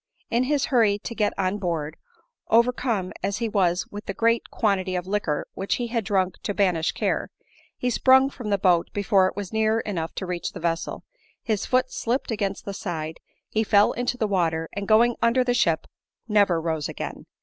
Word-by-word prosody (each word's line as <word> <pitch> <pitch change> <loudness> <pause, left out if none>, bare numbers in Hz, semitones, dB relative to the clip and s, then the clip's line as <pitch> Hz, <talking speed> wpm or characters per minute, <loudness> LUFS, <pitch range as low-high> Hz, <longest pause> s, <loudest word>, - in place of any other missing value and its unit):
In 240 +2 +2
his 285 0 +1
hurry 220 -5 +4
to 220 - -7
get 210 -3 +1
on 195 +1 0
board, 165 -5 -2 0.5
overcome 235 -4 +2
as 195 +1 -1
he 230 - -1
was 185 -4 +1
with 205 +1 -8
the 195 - -3
great 230 0 +1
quantity 190 -3 0
of 180 0 -2
liquor 190 -7 -1
which 195 - -1
he 240 -1 -3
had 230 -1 -1
drunk 190 -3 0
to 205 - -3
banish 180 -5 +1
care, - - -1 0.5
he 250 - -1
sprung 265 +3 +5
from 245 -6 -6
the 200 - +2
boat 180 -3 +3
before 195 -1 +3
it - - -5
was 200 -1 -6
near 220 0 +2
enough 170 -6 -4
to 190 - -3
reach 180 -1 -4
the - - -7
vessel; 165 0 -2 0.4
his 215 -4 -1
foot 255 0 +2
slipped 245 +2 -2
against 200 -3 -2
the 200 - -4
side, 160 -5 -5 0.3
he 220 - 0
fell 205 -1 +4
into 245 0 -2
the 225 - 0
water, 165 -5 0
and 200 0 -4
going 230 +2 +5
under 235 +2 +3
the 245 -1 +1
ship, 170 -9 +2 0.4
never 205 -6 +3
rose 160 -2 -2
again. - - -6
205 Hz, 195 wpm, -25 LUFS, 180-230 Hz, 0.5 s, sprung